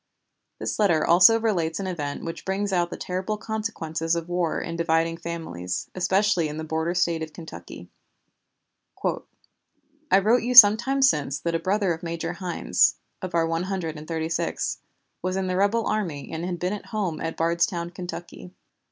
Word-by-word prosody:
This -, -, -4 dB
letter 170 Hz, -7 st, +3 dB
also 185 Hz, +7 st, +7 dB
relates 175 Hz, -8 st, 0 dB
an 195 Hz, -, -3 dB
event 150 Hz, -6 st, -4 dB
which 165 Hz, -, -6 dB
brings 195 Hz, +1 st, -2 dB
out 175 Hz, -1 st, +1 dB
the -, -, -6 dB
terrible 190 Hz, +4 st, -3 dB
consequences 170 Hz, -7 st, -3 dB
of 170 Hz, 0 st, -4 dB
war 175 Hz, -2 st, 0 dB
in 165 Hz, -, -5 dB
dividing 165 Hz, 0 st, +1 dB
families, 165 Hz, -, -5 dB
especially 190 Hz, -1 st, +2 dB
in 150 Hz, 0 st, -6 dB
the 160 Hz, -, -4 dB
border 160 Hz, +2 st, -2 dB
State 170 Hz, -2 st, +1 dB
of 155 Hz, -1 st, -6 dB
Kentucky: 165 Hz, -2 st, -10 dB, 1.2 s
"I 300 Hz, -5 st, -4 dB
wrote 220 Hz, +5 st, +3 dB
you 250 Hz, +2 st, -2 dB
some 210 Hz, -4 st, +11 dB
time 270 Hz, +4 st, -1 dB
since 145 Hz, -, +2 dB
that 170 Hz, -, -2 dB
a 165 Hz, -, +1 dB
brother 195 Hz, -1 st, +1 dB
of 165 Hz, -, -8 dB
Major 170 Hz, -1 st, -4 dB
Hynes 180 Hz, -2 st, +2 dB, 0.3 s
(of 185 Hz, -3 st, -5 dB
our 165 Hz, -1 st, +3 dB
One 165 Hz, +2 st, -1 dB
Hundred 175 Hz, -5 st, -3 dB
and 150 Hz, 0 st, -9 dB
Thirty 160 Hz, -1 st, -2 dB
sixth) 165 Hz, -, -2 dB, 0.4 s
was 185 Hz, +1 st, -2 dB
in 190 Hz, 0 st, -1 dB
the 185 Hz, 0 st, -1 dB
rebel 205 Hz, +4 st, +2 dB
army 180 Hz, -10 st, -3 dB
and 165 Hz, +2 st, -3 dB
had 180 Hz, -1 st, -3 dB
been 180 Hz, +3 st, -2 dB
at 210 Hz, -, -7 dB
home 195 Hz, -8 st, -3 dB
at 165 Hz, 0 st, -4 dB
Bardstown, 170 Hz, +1 st, 0 dB
Kentucky. 180 Hz, 0 st, -8 dB
175 Hz, 180 wpm, -25 LUFS, 165-200 Hz, 1.2 s, some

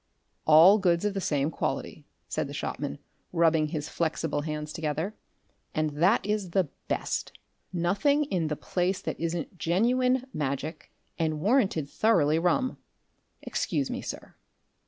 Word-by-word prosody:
"All 165 Hz, +7 st, +8 dB
goods 175 Hz, -1 st, +2 dB
of 205 Hz, -, +1 dB
the 195 Hz, -, -2 dB
same 145 Hz, -2 st, 0 dB
quality," -, -, -3 dB, 0.2 s
said -, -, -2 dB
the -, -, -7 dB
shopman, 70 Hz, -, -3 dB, 0.3 s
rubbing 165 Hz, -2 st, +3 dB
his 150 Hz, -1 st, -4 dB
flexible 160 Hz, -3 st, -1 dB
hands 150 Hz, 0 st, -4 dB
together, 160 Hz, +5 st, -2 dB, 0.6 s
"and 155 Hz, -1 st, +1 dB
that 175 Hz, +10 st, +3 dB
is 210 Hz, -3 st, -1 dB
the 180 Hz, -3 st, +1 dB, 0.2 s
Best. -, -, -2 dB, 0.4 s
Nothing 200 Hz, -, +2 dB
in 180 Hz, -, -1 dB
the 150 Hz, -, -1 dB
place 185 Hz, +4 st, -1 dB
that -, -, -5 dB
isn't 165 Hz, +1 st, -3 dB
genuine 250 Hz, +8 st, +2 dB
Magic, 150 Hz, +2 st, -3 dB, 0.3 s
and 155 Hz, -2 st, 0 dB
warranted 195 Hz, -, +2 dB
thoroughly 160 Hz, -5 st, +3 dB
rum. 220 Hz, +10 st, +1 dB, 0.6 s
Excuse -, -, -1 dB
me, -, -, -3 dB
sir!" -, -, -7 dB
170 Hz, 135 wpm, -28 LUFS, 155-200 Hz, 0.6 s, All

